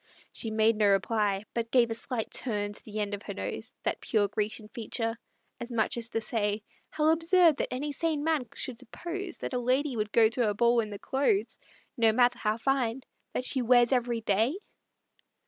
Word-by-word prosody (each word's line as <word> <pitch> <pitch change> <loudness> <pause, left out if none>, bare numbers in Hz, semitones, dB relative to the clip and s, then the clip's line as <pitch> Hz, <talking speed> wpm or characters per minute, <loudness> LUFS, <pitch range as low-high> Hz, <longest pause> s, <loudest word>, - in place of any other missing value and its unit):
She 225 - -4
made 220 0 +2
no 210 -1 +3
reply, 200 0 +1
But 230 -1 -2
gave 235 -2 +3
a - - +1
slight 230 0 -3
turn 205 -4 -1
to - - -7
the 215 0 -6
end 205 -1 -2
of 200 - -4
her - - -7
nose - - -5
(That - - -1
pure 210 -3 +1
Grecian 210 +1 -3
feature), 225 0 -3 0.4
as 240 +1 -6
much 225 -2 +1
as 235 -1 -1
to 225 - -1
say, 215 -1 -1 0.3
"How 310 0 +1
absurd 330 -1 +4
that - - -2
any 285 +4 -3
sane 305 0 -1
man 310 -6 0
should 245 -3 -2
suppose 345 - -5
That - - -5
a 250 - 0
lady 260 +3 +1
would 210 -1 -2
go 225 -1 +6
to 230 0 0
a 205 - -2
ball 235 +2 +3
in 220 -2 -1
the 205 - -6
clothes, 285 - 0 0.4
No 225 -2 +5
matter 245 +1 +3
how 215 0 0
fine, 260 -1 0 0.3
that 250 - -2
she 260 - +2
wears 245 0 +4
every 240 -2 +1
day!" 225 - +1
235 Hz, 200 wpm, -29 LUFS, 215-260 Hz, 0.4 s, go